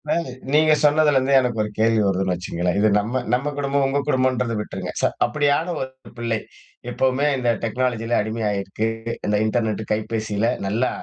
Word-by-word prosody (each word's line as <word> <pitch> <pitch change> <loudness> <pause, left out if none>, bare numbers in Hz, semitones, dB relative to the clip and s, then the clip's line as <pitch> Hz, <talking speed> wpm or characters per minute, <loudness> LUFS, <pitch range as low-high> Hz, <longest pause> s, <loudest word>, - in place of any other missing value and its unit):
இப்ப 150 - 0 0.4
நீங்க 155 +1 +5
சொன்னதுலேருந்தே 145 -3 +4
எனக்கு 120 -4 0
ஒரு 105 - -4
கேள்வி 110 0 +3
வருதுன்னு 95 -1 +1
வச்சுக்கங்களேன். 90 0 -2
இது 105 - +4
நம்ம 120 +5 -2
நம்ம 140 +4 0
குடும்பம் 140 -1 +1
உங்க 140 +1 0
குடும்பம்ன்றத 130 -3 +1
விட்டுருங்க. - - -6
ச - - -6 0.2
அப்படியான 150 +3 +1
ஒரு 130 -1 -9
பிள்ளை. 115 -2 -1 0.5
எப்பவுமே 130 +3 +1
இந்த 125 -2 0
டெக்னாலஜியில 120 0 0
அடிமையாயிருக்கு, 105 -1 -2 0.4
இந்த 105 - +1
இன்டர்நெட் 110 -1 0
கைபேசியில. 110 0 -1 0.2
நல்லா 115 +6 +1
120 Hz, 145 wpm, -22 LUFS, 110-135 Hz, 0.5 s, நீங்க